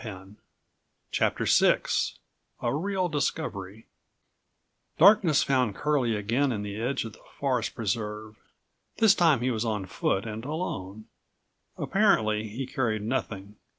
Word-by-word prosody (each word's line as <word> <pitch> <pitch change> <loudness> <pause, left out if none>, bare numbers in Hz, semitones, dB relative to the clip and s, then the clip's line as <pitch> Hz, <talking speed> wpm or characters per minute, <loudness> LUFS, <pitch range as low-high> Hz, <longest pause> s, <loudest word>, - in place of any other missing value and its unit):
64 95 -5 -9 0.8
CHAPTER - - 0
VIA - - +5 0.9
REAL 185 +4 -1
DISCOVERY 110 - -3 1.1
Darkness 180 -5 +6
found 125 -7 +1
Curlie 135 -7 +1
again 115 +7 0
on 105 -3 -3
the 100 -1 -5
edge 125 +1 -1
of 110 - -8
the - - -17 0.2
Forest 130 -5 -1
Preserve. 105 0 -3 0.6
This 220 -3 +6
time 160 -10 +3
he 130 +1 +1
was 110 -1 -1
on 105 -4 -2
foot 95 +2 -1
and 110 0 -6
alone. 110 - -5 0.7
Apparently 110 - +2
he 120 +6 -5
carried 115 -5 -1
nothing. 105 -4 -4
115 Hz, 120 wpm, -27 LUFS, 105-145 Hz, 1.1 s, Darkness